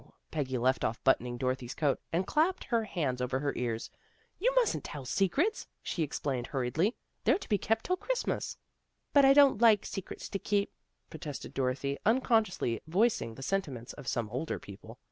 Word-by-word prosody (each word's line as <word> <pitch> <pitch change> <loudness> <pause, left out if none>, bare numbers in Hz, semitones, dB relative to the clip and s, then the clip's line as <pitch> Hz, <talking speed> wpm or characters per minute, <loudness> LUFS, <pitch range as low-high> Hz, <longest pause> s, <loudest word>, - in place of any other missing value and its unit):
" - - -46
Peggy 135 -4 -1
left 130 +2 +2
off 115 - -2
buttoning 125 -2 +2
Dorothy's 130 0 -2
coat, 145 -3 +1
and 175 +3 +1
clapped 325 - +1
her 230 -2 0
hands 140 -11 -2
over 125 +1 0
her 140 0 -1
ears. 115 -2 -3 0.2
'* - - -38
You 480 +7 +3
mustn't - - +2
tell 140 -3 -7
secrets," 275 - +1 0.2
she 170 - -2
explained 135 -4 -2
hur 135 - -2
riedly. 170 - +1
" - - -48
They're - - +4
to 395 - -10
be 205 -3 +2
kept 225 0 0
till 365 - +1
Christmas." - - -2 0.3
" - - -50
But 285 -1 +7
I 270 - +8
don't 275 -5 +6
like 220 -4 +6
secrets 195 - -6
to 195 - -3
keep," 200 0 0 0.4
protested 150 -3 -7
Dorothy, 135 +2 -1
unconsciously 220 - +2
voicing 185 - +1
the 135 - -8
sentiments 135 -9 -2
of 140 -4 -11
some 120 -4 -1
older 135 +7 -2
people. 110 +4 -11
155 Hz, 190 wpm, -31 LUFS, -, 0.4 s, I